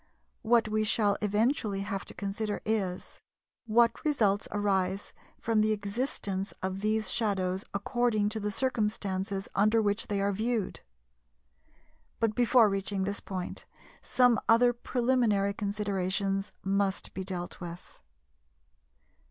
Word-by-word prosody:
What 230 0 +3
we 215 0 +1
shall 210 -1 +2
eventually 210 0 +1
have 195 -1 -4
to - - -6
consider 205 +1 -3
is: 195 -5 -2 0.5
What 230 +1 +3
results 215 -10 +2
arise 195 -1 -1 0.3
from 225 -1 +1
the 215 0 +3
existence 200 -2 -3
of 190 +1 -2
these 215 +1 +1
shadows 190 -4 0
according 215 0 +1
to 220 +1 -3
the 210 0 -2
circumstances 200 -4 -1
under 215 +3 +3
which 205 0 +1
they 205 -2 -1
are 200 +1 +1
viewed? 220 0 -1 1.4
But 225 -2 +1
before 240 0 +5
reaching 195 -1 -1
this 200 +1 -2
point, 185 -2 -6 0.4
some 245 -3 +3
other 240 +2 +6
preliminary 235 -5 +1
considerations 200 -1 -1
must 195 0 0
be 190 - -4
dealt 180 -2 -5
with. 175 0 -9
205 Hz, 120 wpm, -29 LUFS, 195-225 Hz, 1.4 s, other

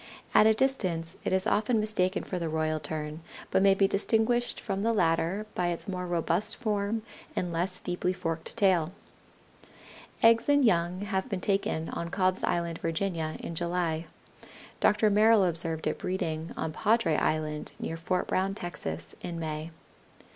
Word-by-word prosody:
At 215 - +7
a 220 - +6
distance 185 -11 +1
it - - -1
is 190 0 +2
often 220 +2 +2
mistaken 205 -3 0
for 180 - -4
the 165 -2 -2
Royal 155 0 0
Tern, 155 0 -5 0.3
but - - +3
may 195 0 +5
be 195 0 +4
distinguished 225 +4 +1
from 195 0 -3
the 230 +2 +2
latter 175 +1 +1
by 180 - 0
its 175 +4 -3
more 180 -2 -3
robust 175 +2 0
form 215 -1 -1 0.3
and 175 -2 -2
less 180 +2 -1
deeply 180 0 -1
forked 165 -3 -4
tail. 180 -4 +3 1.3
Eggs 230 +3 +5
and 285 -2 +5
young 175 -2 +2
have 195 -2 -2
been 195 - -2
taken 190 -4 -1
on 170 - -4
Cobb's 185 0 +1
Island, 170 -1 -1
Virginia, 165 -1 -2
in - - -5
July. 170 -1 -1 0.7
Dr. 210 0 +4
Merrill 215 0 +5
observed 165 -2 +1
it - - -1
breeding 165 -3 -3
on 160 -1 -3
Padre 215 -4 +2
Island, 155 0 -1
near 165 - -3
Fort 175 +3 -1
Brown, 195 +1 0
Texas, 85 - -5
in 170 -1 -5
May. 155 0 -4
180 Hz, 160 wpm, -29 LUFS, 165-200 Hz, 1.3 s, At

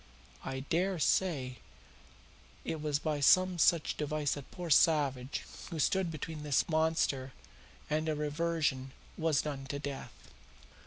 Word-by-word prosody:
I 130 0 -4
dare 180 +7 0
say 145 -7 +1 1.1
it 160 - -3
was 150 -2 0
by 150 -1 -2
some 185 +5 +5
such 165 0 +3
device 150 -1 -1
that 145 -2 -8
poor 175 -3 -6
Savage, 140 -4 +3 0.3
who 170 - -5
stood 185 +4 +1
between 155 0 -6
this 145 -3 +1
monster 155 -5 +1 0.5
and 155 +1 0
a 155 - 0
reversion, 150 -3 -1 0.2
was 160 -3 +1
done 140 -3 -5
to 140 - -3
death. 140 -1 -8
150 Hz, 130 wpm, -32 LUFS, 140-165 Hz, 1.1 s, some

